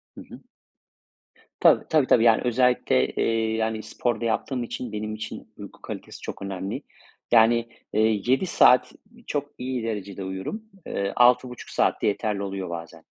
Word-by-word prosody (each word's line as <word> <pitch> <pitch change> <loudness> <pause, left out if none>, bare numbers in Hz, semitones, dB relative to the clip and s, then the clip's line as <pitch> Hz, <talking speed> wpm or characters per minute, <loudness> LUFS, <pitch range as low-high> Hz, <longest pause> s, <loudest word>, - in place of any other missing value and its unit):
Hı - - -9
hı. - - -12 1.2
Tabii. - - +5
Tabii, 155 -4 +4
tabii. 115 - +4
Yani 115 -2 +5
özellikle, 125 - +2
eee, 110 -1 0
yani 110 -1 -1
spor 110 +1 -2
da - - -3
yaptığım 120 +3 -1
için 120 0 -5
benim 105 0 -4
için 110 0 -7
uyku - - -11
kalitesi - - -8
çok - - -7
önemli. 95 0 -4 0.5
Yani, 115 0 +5 0.2
eee, 110 0 +2
7 130 +9 +2
saat 125 -7 +5 0.3
çok 145 -1 -3
iyi 125 -1 -3
derecede 100 -3 -4
uyurum. 95 - -5 0.2
Eee, 100 0 -2
6,5 125 0 +3
saatte - - +1
yeterli 105 0 -1
oluyor 95 -2 -4
bazen. 85 -2 -8
110 Hz, 150 wpm, -25 LUFS, 100-125 Hz, 1.2 s, Tabii